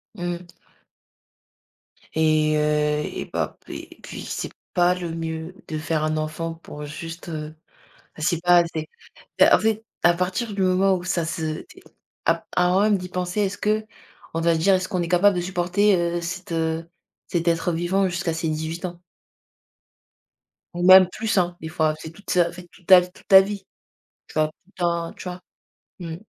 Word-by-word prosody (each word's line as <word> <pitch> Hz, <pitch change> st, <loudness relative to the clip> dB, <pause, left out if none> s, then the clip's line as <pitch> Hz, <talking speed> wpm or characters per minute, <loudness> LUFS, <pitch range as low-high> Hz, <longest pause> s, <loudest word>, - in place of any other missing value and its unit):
Mmh. 175 Hz, -1 st, -4 dB, 1.7 s
Et 155 Hz, -1 st, +3 dB
heu, 150 Hz, 0 st, +1 dB, 0.2 s
et -, -, -3 dB
bap -, -, -3 dB
et -, -, -9 dB
puis, -, -, -8 dB
c'est -, -, -4 dB, 0.2 s
pas 175 Hz, 0 st, +4 dB
le 175 Hz, -2 st, -5 dB
mieux 165 Hz, +2 st, -5 dB
de 155 Hz, -, -3 dB
faire 155 Hz, 0 st, -1 dB
un 155 Hz, 0 st, 0 dB
enfant 160 Hz, +2 st, -3 dB
pour 150 Hz, -2 st, -9 dB
juste, 165 Hz, +3 st, -8 dB
heu 155 Hz, -1 st, -6 dB, 0.6 s
c'est 160 Hz, +2 st, 0 dB
pas 175 Hz, 0 st, +6 dB
assez. 165 Hz, -2 st, -1 dB, 0.5 s
Bah, -, -, +7 dB
en -, -, +6 dB
fait, 220 Hz, 0 st, 0 dB, 0.2 s
à 175 Hz, -, +5 dB
partir 190 Hz, +5 st, -2 dB
du 195 Hz, -, -1 dB
moment 190 Hz, +1 st, +3 dB
où 180 Hz, -1 st, -4 dB
ça 170 Hz, -2 st, 0 dB
se 160 Hz, -1 st, -3 dB
t -, -, -17 dB, 0.4 s
ap -, -, +1 dB
avant 180 Hz, +2 st, +4 dB
même 210 Hz, -1 st, +4 dB
d'y 180 Hz, -, -7 dB
penser. 180 Hz, +3 st, -2 dB
Est-ce 200 Hz, 0 st, -2 dB
qu'on 215 Hz, -5 st, -4 dB
va 165 Hz, 0 st, +3 dB
dire 190 Hz, +4 st, +4 dB
est-ce 185 Hz, 0 st, 0 dB
qu'on 180 Hz, -4 st, -1 dB
est 170 Hz, -, -3 dB
capable 185 Hz, +3 st, +4 dB
de 175 Hz, -, +1 dB
supporter, 185 Hz, +3 st, +2 dB
heu, 170 Hz, 0 st, 0 dB
cet, 180 Hz, 0 st, -5 dB
heu, 165 Hz, 0 st, -1 dB, 0.4 s
cet 170 Hz, -1 st, -1 dB
être 170 Hz, +1 st, +1 dB
vivant 180 Hz, +4 st, +1 dB
jusqu'à 175 Hz, -1 st, -2 dB
ses 165 Hz, 0 st, -2 dB
18 160 Hz, +3 st, -3 dB
ans? 175 Hz, -1 st, -9 dB, 1.7 s
Ou 175 Hz, -, -3 dB
même 185 Hz, -1 st, +9 dB
plus, 220 Hz, +1 st, -2 dB
hein, 175 Hz, -1 st, +2 dB
des 160 Hz, -, -5 dB
fois. 155 Hz, -1 st, +1 dB
C'est 160 Hz, -, -8 dB
toute 200 Hz, +5 st, -15 dB
sa 175 Hz, -1 st, +3 dB
en -, -, -9 dB
fait, 180 Hz, 0 st, -11 dB
toute 180 Hz, -, -21 dB
ta 185 Hz, -1 st, +10 dB
v 180 Hz, -, -7 dB
toute -, -, -20 dB
ta 190 Hz, -1 st, +9 dB
vie, 200 Hz, -1 st, -5 dB, 0.6 s
tu -, -, -15 dB
vois? 155 Hz, 0 st, +2 dB
Tout 155 Hz, -, -14 dB
le 195 Hz, -, -25 dB
temps, 170 Hz, -1 st, 0 dB
tu -, -, -11 dB
vois? 180 Hz, -, -7 dB, 0.6 s
Mmh. 165 Hz, -2 st, -5 dB
175 Hz, 185 wpm, -23 LUFS, 160-185 Hz, 1.7 s, ta